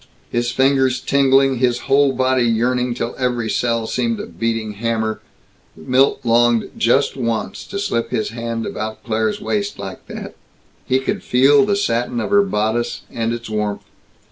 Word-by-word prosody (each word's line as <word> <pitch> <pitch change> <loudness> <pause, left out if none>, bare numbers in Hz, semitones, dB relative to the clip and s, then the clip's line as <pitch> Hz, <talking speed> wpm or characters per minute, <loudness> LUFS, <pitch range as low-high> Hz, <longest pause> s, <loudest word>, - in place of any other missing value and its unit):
His 120 0 0
fingers 130 -1 +2
tingling, 135 -1 +3
his 120 -1 +1
whole 140 +1 +3
body 130 0 +1
yearning 120 +1 +1
till 115 0 -3
every 120 -3 -1
cell 115 -2 0
seemed 230 - -1
a - - -4
beating 115 -1 -2
hammer, 110 +1 -2 0.6
Milt 130 - +2
longed 120 -1 +3
just 135 +5 +2
once 115 -4 -3
to 200 - -5
slip 120 -12 -1
his 110 - -1
hand 115 0 -4
about 110 0 -5
Claire's 110 -2 -1
waist 205 -1 -2
like 95 -1 -8
that. - - -7 0.5
He 130 - +3
could 135 - -2
feel 140 +8 +4
the 205 - +2
satin 120 -10 -1
of 115 - -3
her 205 0 +6
bodice 120 - -1
and 115 -1 -2
its 120 0 -5
warmth. 105 -1 -2
120 Hz, 160 wpm, -19 LUFS, 115-135 Hz, 0.6 s, her